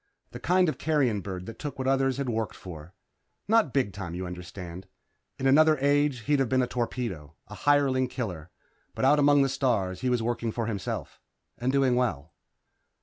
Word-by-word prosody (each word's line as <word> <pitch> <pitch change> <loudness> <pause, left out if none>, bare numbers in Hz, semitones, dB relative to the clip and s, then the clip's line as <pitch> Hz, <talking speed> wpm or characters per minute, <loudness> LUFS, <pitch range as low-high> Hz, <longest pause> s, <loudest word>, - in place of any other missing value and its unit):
The - - -8
kind 180 +2 +3
of 155 - -2
carrion 135 -10 +1
bird 90 -1 -6
that 115 - -9
took 145 -1 -5
what 130 0 -3
others 135 -1 +2
had 140 -1 -2
worked 115 -2 -2
for. 85 -1 -10 0.5
Not 220 - +3
big 125 -8 0
time, 85 -1 -6
you 90 +1 -4
understand. 90 0 -8 0.5
In 135 - -4
another 155 +3 +5
age 145 -2 +2
he'd 145 +5 +1
have 135 -3 +1
been 130 -1 +3
a - - -1
torpedo 115 - -4
a - - -9
hireling 135 +2 +2
killer. 90 - -5 0.5
But - - 0
out 145 +2 +5
among 145 -1 +5
the - - +2
stars 115 -9 0
he 130 - 0
was 120 -2 +1
working 120 -1 -1
for 115 +1 -2
himself. 105 -4 -4 0.4
And 125 +2 0
doing 135 -2 +3
well. 85 - -1
125 Hz, 190 wpm, -27 LUFS, 95-140 Hz, 0.5 s, another